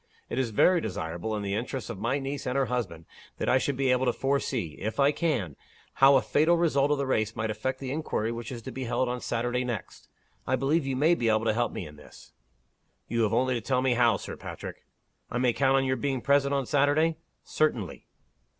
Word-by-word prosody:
It - - -1
is 130 -3 0
very 170 - +4
desirable, 90 +1 -4
in 105 - -3
the 100 0 -2
interests 120 +4 -3
of 95 - -7
my 130 +6 0
niece 140 +1 -4
and 125 +2 -1
her 135 - +2
husband, 105 -11 -3 0.3
that - - -3
I 130 - +4
should 140 0 -1
be 135 -1 +2
able 125 0 +2
to - - +4
foresee, 135 - -1
if 110 +6 -4
I 140 +1 +5
can, 135 - -1 0.5
how 135 +1 +8
a 130 - +4
fatal 165 +3 +3
result 145 -4 +2
of 150 - +2
the 140 - -1
race 110 -4 0
might 110 -1 -2
affect 130 +5 -3
the 130 -2 -5
inquiry 135 -7 -2
which 115 +1 -6
is 120 -3 -7
to - - -6
be 130 -1 -5
held 120 +2 0
on 125 0 -3
Saturday 120 +2 -1
next. 120 -5 -6 0.4
I 130 - +2
believe 135 +3 +1
you 135 - -1
may 155 +6 +4
be 120 -9 +1
able 110 0 +2
to 110 - +2
help 120 0 0
me - - -5
in 75 0 -12
this." 75 - -16 0.7
"You 115 0 0
have 110 -1 +1
only 130 +1 +2
to 120 - -2
tell 130 +3 0
me 130 -1 +3
how, 120 -2 +3
Sir - - -7
Patrick." - - -8 0.5
"I 125 - -3
may 125 -1 +2
count 135 +2 +3
on 135 - +2
your 130 0 0
being 135 0 -1
present 140 +1 +3
on 140 -2 0
Saturday?" 145 +4 +2 0.3
"Certainly." 120 - -1
130 Hz, 230 wpm, -28 LUFS, 115-140 Hz, 0.7 s, how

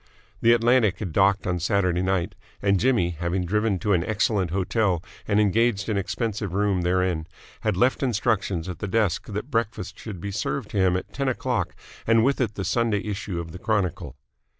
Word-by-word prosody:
The 115 +1 +6
Atlantic 120 -3 +3
had 90 -7 -5
docked 100 +2 +3
on 90 -1 0
Saturday 90 0 +1
night, 95 -2 0 0.3
and 100 -1 +2
Jimmy, 115 -8 +2
having 85 +2 -2
driven 105 +2 +1
to 105 +2 0
an 85 -2 +2
excellent 105 -3 0
hotel 95 0 0 0.2
and 105 0 +3
engaged 105 0 +2
an 105 - 0
expensive 100 -1 -3
room 100 -2 +1
therein, 90 -2 0 0.3
had 110 -4 -1
left 125 +5 +2
instructions 110 -8 0
at 90 -4 -6
the 105 - -3
desk 100 -4 0
that 105 +7 -5
breakfast 110 -5 -2
should 105 -5 -7
be 100 +4 -5
served 110 +3 -3
to - - -3
him 95 -1 +3
at 95 - -7
ten 140 0 0
o'clock 120 -8 -1 0.3
and 115 0 +5
with 135 +2 +2
it 110 -5 -1
the 95 - -3
Sunday 115 -4 +1
issue 100 -4 -4
of 80 -1 -6
the 90 - -9
Chronicle. 100 -5 -1
100 Hz, 190 wpm, -25 LUFS, 90-115 Hz, 0.3 s, The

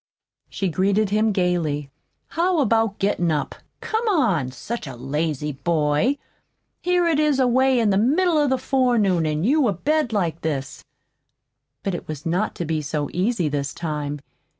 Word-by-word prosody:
she 195 - -2
greeted 195 +4 +1
him 215 +1 +2
gayly. 165 -7 -1 0.4
"How 345 +1 +1
about 225 -5 +2
gettin' 195 -4 0
up? 150 - -1 0.3
Come 445 +1 -2
on! 225 - +2
Such 160 - -6
a 135 - -7
lazy 150 +3 -2
boy! 150 - +1 0.6
Here 355 0 +2
it 320 -3 +2
is 300 -3 +2
away 260 0 +3
in 220 -3 +2
the 195 - +3
middle 315 - +3
of 290 -2 +2
the 265 - +2
forenoon, 230 - +2
an' 155 +1 -1
you 275 +4 +3
abed 280 - 0
like 175 -6 -1
this!" 140 -4 -4 1.0
But 195 - -1
it 175 - -5
was 150 -2 -7
not 180 +6 0
to 175 - -3
be 160 -1 -1
so 145 0 -3
easy 185 -1 0
this 140 -2 -3
time. 150 -3 -4
195 Hz, 160 wpm, -23 LUFS, -, 1.0 s, away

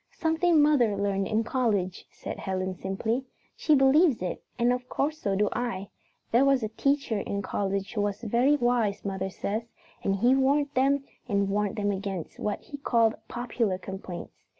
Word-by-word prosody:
"Something 325 -1 +3
mother 245 -9 +3
learned 195 -1 0
in 220 +1 +1
college," 215 -7 -1
said - - -7
Helen 185 0 -2
simply. 220 +7 -2 0.3
"She 310 - +3
believes 270 - +4
it, 180 - -4
and 240 0 +3
of 250 0 -5
course 305 +3 -1
so 200 -1 0
do 210 +2 +2
I. 200 -5 -3 0.4
There 240 +3 +5
was 275 -3 +3
a 215 - -1
teacher 275 -1 0
in 200 0 -3
college 195 0 -2
who 210 - 0
was 205 +2 -2
very 240 +6 +3
wise, 240 -7 +1
mother 190 -1 -2
says, 220 +4 -3 0.3
and 195 - +1
he 240 +6 +4
warned 280 +2 +2
them 275 +2 +2 0.3
and 200 -1 +1
warned 205 0 0
them 205 -2 0
against 195 -3 -5
what 210 -1 -2
he 285 - -9
called 230 -5 +2
popular 235 -5 -1
complaints. 190 -2 -7
225 Hz, 175 wpm, -27 LUFS, 195-265 Hz, 0.4 s, There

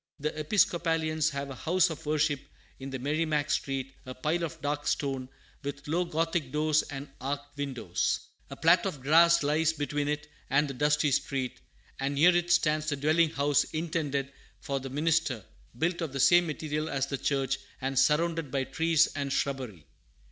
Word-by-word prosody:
The 150 +1 -2
Episcopalians 160 -2 +1
have 140 0 -5
a - - -7
house 175 +4 +2
of 160 0 -8
worship 150 -1 +1 0.4
on 135 - -5
Merrimac 150 0 0
Street, 135 -1 -2
a 130 -1 -8
pile 155 +6 -1
of 160 - -4
dark 145 0 -2
stone, 135 -3 -1 0.3
with 140 0 -6
low 175 +4 +1
Gothic 165 -4 -1
doors 155 +1 +2
and 140 0 -7
arched 145 +2 -4
windows. 140 -4 -1 0.3
A - - -7
plat 170 +4 +4
of 145 -9 -6
grass 170 +3 +5
lies 155 +2 +2
between 145 -1 -2
it 150 0 -2 0.2
and 145 +3 +3
the 135 - -5
dusty 150 +2 +2
street; 130 -1 -1 0.4
and 135 +1 -1
near 175 +5 +6
it 175 0 +1
stands 155 -2 +2
the 145 - 0
dwelling 155 +3 +3
house 145 -1 +2
intended 150 -4 -2 0.3
for 140 -1 -3
the 135 0 -7
minister, 150 - 0 0.3
built 170 +5 0
of 160 -5 -3
the 135 - -3
same 175 +5 +5
material 155 0 -3
as 135 -1 0
the 140 - -3
church 135 -1 0 0.2
and 135 0 0
surrounded 160 +2 +2
by 135 0 0
trees 165 +3 +3
and 140 -1 -2
shrubbery. 130 - -2
150 Hz, 170 wpm, -29 LUFS, 140-160 Hz, 0.4 s, near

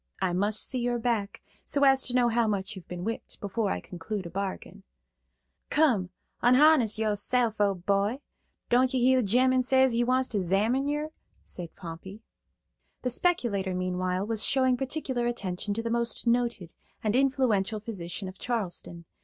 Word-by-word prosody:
"I 180 - 0
must 205 +4 0
see 255 - -2
your 240 0 0
back, 225 -4 -2 0.2
so 285 - 0
as 270 -1 +5
to 250 - 0
know 245 -1 +4
how 230 0 +2
much 200 0 -2
you've 190 - -11
been 180 0 -6
whipped, 225 +3 -4
before 205 +1 -2
I - - -1
conclude 185 +3 -6
a 170 - -7
bargain." 195 +1 -5 0.9
"Cum, 245 -12 +2 0.3
unharness 255 -3 +5
yoseff, 220 +1 +1
ole 200 -1 +3
boy. 200 +6 0 0.5
Don't 255 +2 +2
you - - +2
hear 255 +1 +4
the 215 - -2
gemman 255 +4 +3
say 260 +1 +4
he 235 +1 +2
wants 255 +1 +1
to 210 - -1
zammin 215 +10 +1
yer?" 300 +1 -2 0.3
said 175 -2 -8
Pompey. 190 +5 -9 0.8
The 250 - 0
speculator, 230 - 0
meanwhile, 185 +1 -1
was 220 0 -1
showing 260 -2 +2
particular 260 -2 -2
attention 200 -3 -3
to 230 - -3
the 230 - -2
most 235 +1 0
noted 235 -7 0 0.3
and 215 +1 +1
influential 250 -6 +1
physician 195 -3 -6
of 185 0 -10
Charleston. 180 -7 -4
225 Hz, 165 wpm, -28 LUFS, 195-255 Hz, 0.9 s, as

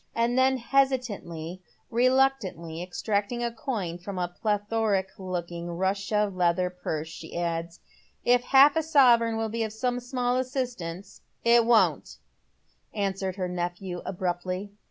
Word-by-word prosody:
And 235 +1 +1
then, 260 0 +4
hesitatingly, 230 -11 -1 0.3
reluctantly 235 -10 +1
extracting 205 +6 -2
a 235 - -1
coin 215 -7 -4
from 190 +2 -6
a 180 -1 0
plethoric 205 0 0
looking 175 -2 -4
Russia 195 +4 0
leather 180 0 +1
purse, 160 -3 -4
she 160 +1 -8
adds, 170 0 -3 0.3
" - - -38
If 245 0 -2
half 275 +2 +7
a 320 - +3
sovereign 245 -7 +4
will 225 0 -1
be 230 +1 -3
of 220 - -3
som* 245 +3 -1
Bmall 245 0 -1
assistance 240 - -4
" - - -46
" - - -43
It 235 -1 +4
won't," 235 -2 +3 0.8
answered 195 -2 -2
her 185 -2 -2
nephew, 175 0 -4
abruptly. 185 +2 -3
200 Hz, 140 wpm, -27 LUFS, 175-245 Hz, 0.8 s, half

